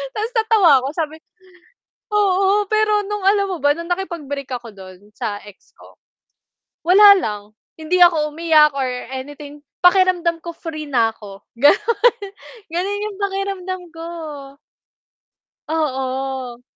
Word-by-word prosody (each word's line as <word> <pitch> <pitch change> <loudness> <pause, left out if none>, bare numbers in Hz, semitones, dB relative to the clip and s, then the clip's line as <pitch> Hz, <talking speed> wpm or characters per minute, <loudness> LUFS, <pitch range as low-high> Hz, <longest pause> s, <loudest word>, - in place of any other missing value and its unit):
Ta's 435 +3 -3
natawa 420 -10 +4
ko - - -1
sabi 315 -2 -3 1.0
oo, 400 0 +2
pero 430 -1 +2
nung 415 0 -4
alam 400 0 +3
mo 365 - -3
ba 290 0 +2
nung 335 +2 -8
nakipag-break 310 -7 -4
ako 240 -2 -7
dun 190 +1 -14
sa 205 -1 -5
ex 205 -2 -17
ko? - - -19 0.9
Wala 405 +3 +8
lang. 210 - -4 0.3
Hindi 325 +3 -1
ako 320 -4 +4
umiyak 310 -2 +4
or 265 -2 -1 0.2
anything 290 +2 -8 0.2
pakiramdam 360 -2 +3
ko 340 - -5
free 310 -3 -7
na 230 -4 +2
ako. 205 -2 -13 0.2
Ganun. 435 - +3 0.6
Ganun 395 +4 -2
yung 420 -2 -7
pakiramdam 390 -2 -3
ko. 330 0 -9 1.6
Oo. 265 -4 -3
330 Hz, 125 wpm, -19 LUFS, 270-390 Hz, 1.6 s, Wala